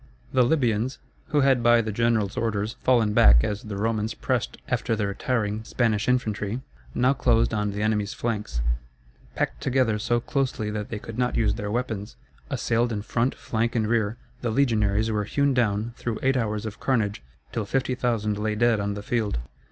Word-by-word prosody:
The 130 - +4
Libyans, 125 -2 +1 0.3
who 150 - +2
had 135 -2 +4
by 120 0 +5
the 110 -1 -1
general's 110 -2 +1
orders 110 -1 -1
fallen 115 -5 +3
back - - +7
as 105 0 -2
the 105 -2 -6
Romans 110 +1 -1
pressed - - -1
after 115 - 0
the 105 -2 -1
retiring 105 +1 -1
Spanish 115 -2 0
infantry, 110 -2 0 0.3
now 130 +2 +3
closed 120 -4 +2
on 105 -1 0
the 105 +1 -3
enemy's 105 -2 0
flanks. 105 - -2 0.7
Packed - - -2
together 125 -5 +1
so 120 +2 +1
closely 125 -5 -1
that 105 -1 -4
they 110 - -3
could 115 +2 -7
not 125 0 +1
use 110 - +2
their 105 0 -4
weapons, 110 -3 -3 0.3
assailed 120 +1 0
in 105 -2 -3
front, 120 +4 0
flank, 115 +1 -2
and 110 -2 +2
rear, 110 -1 +1 0.2
the 120 - -1
legionaries 110 -4 +2
were 105 -1 0
hewn 140 +5 +1
down 115 -2 0
through 115 -2 -3
eight 135 0 +3
hours 110 -3 -1
of 110 -1 -6
carnage, 110 - 0 0.3
till 110 -3 -3
50,000 120 -5 0
lay 105 0 -1
dead 120 0 +3
on 100 0 -2
the 105 - -6
field. 110 - 0
110 Hz, 180 wpm, -25 LUFS, 105-120 Hz, 0.7 s, back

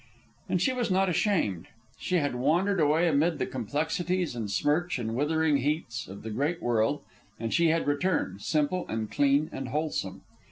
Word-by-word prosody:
And - - +1
she 260 - +2
was 245 -3 -1
not 190 0 +2
ashamed. 165 - 0 0.3
She 185 - -1
had 145 -6 +1
wandered 170 +10 +1
away 155 +3 +3
amid 160 +1 +2
the - - -1
complexities 160 - -2
and 110 -3 -4
smirch 160 - +1
and 115 -2 -3
withering 150 +3 +2
heats 140 -3 -2
of 95 +2 -10
the 110 - -5
great 145 +10 -1
world, 120 +4 +1 0.4
and 115 0 -3
she 170 0 +4
had 165 +1 +2
returned, 145 - 0
simple, 155 - 0
and 110 -1 -3
clean, 145 +2 +3
and 135 -1 -5
wholesome. 135 -10 -2
150 Hz, 170 wpm, -28 LUFS, 120-170 Hz, 0.4 s, she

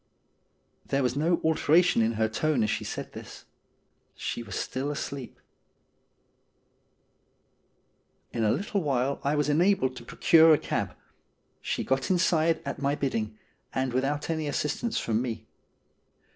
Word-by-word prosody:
'' - - -44
There 140 0 +1
was 125 0 0
no 165 +4 +2
alteration 160 -2 +4
in 115 +1 +2
her 110 0 +1
tone 135 +2 0
as 105 - +1
she - - -2
said - - -6
this. - - -10 0.7
She - - -4
was 105 -5 -7
still 135 +3 -3
asleep. 140 -2 -5 2.9
In 115 - -1
a 105 - +3
little 205 0 -1
while 140 -2 0
I 140 +2 +1
was 150 0 +1
enabled 150 -3 +2
to 120 - -9
procure 160 +6 +5
a - - 0
cab. - - -3 0.7
She - - -2
got 135 0 0
inside 165 -3 +2
at 140 0 -5
my 140 +1 +1
bidding, 110 -7 -2 0.4
and 130 -1 0
without 140 +5 -1
any 160 -2 -2
assist 145 +1 -1
ance 235 -2 -1
from 115 0 0
me. 115 -3 -4
140 Hz, 145 wpm, -27 LUFS, 125-160 Hz, 2.9 s, procure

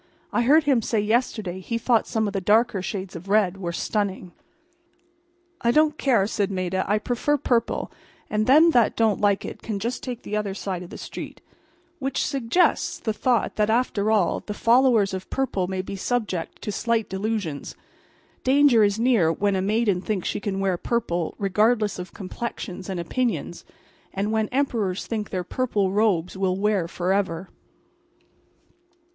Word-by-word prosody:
I - - +2
heard 295 +6 +5
him 275 -5 +3
say 220 0 0
yesterday 210 -4 0
he 230 +5 -3
thought 230 0 +2
some 220 -1 0
of 200 - -3
the 195 - -1
dark 220 +6 +3
shades 190 -2 -5
of 175 +4 -9
red 200 -3 +3
were 175 -3 -4
stunning." 190 0 -2 1.3
"I 235 - +2
don't 305 +4 +4
care," 240 -8 +3
said 205 -1 -1
Maida. 185 -1 -1
"I 210 +2 +2
prefer 245 +7 0
purple, 240 -4 0 0.4
and 215 0 -1
them 310 +6 +7
that 240 -7 +3
don't 220 -3 +2
like 200 -1 +2
it - - -7
can 215 -3 -3
just 230 +5 -3
take 245 -2 -6
the 210 - -4
other 205 -2 -2
side 190 -3 -4
of 180 - -9
the - - -9
street." - - -8 0.6
Which 270 -1 -1
suggests 275 +7 +1
the 220 - -2
thought 240 +2 0
that 210 0 +2
after 220 -3 +1
all, 210 -5 +2
the 210 - -7
followers 230 -4 +4
of 185 0 -5
purple 230 -9 -1
may 185 0 -3
be 195 - -6
subject 195 -5 -3
to 210 - -2
slight 230 +1 0
delusions. 190 -6 -3 0.7
Danger 265 -4 +5
is 205 0 +2
near 225 -9 +3
when 200 +3 0
a 190 - 0
maiden 205 -2 +1
thinks 200 -3 -2
she - - -2
can 195 -1 -3
wear 190 -2 0
purple 175 -7 -2
regardless 210 +1 +1
of 180 - -7
complexions 195 -1 -6
and 185 -2 -3
opinions; 240 +8 -2 0.5
and 200 +2 -1
when 220 -1 +1
Emperors 230 -9 -1
think 215 -3 -3
their 185 -1 -2
purple 205 -2 -1
robes 195 -5 +1
will 190 -1 0
wear 200 -4 +1
forever. 185 0 -1
210 Hz, 170 wpm, -24 LUFS, 190-235 Hz, 1.3 s, them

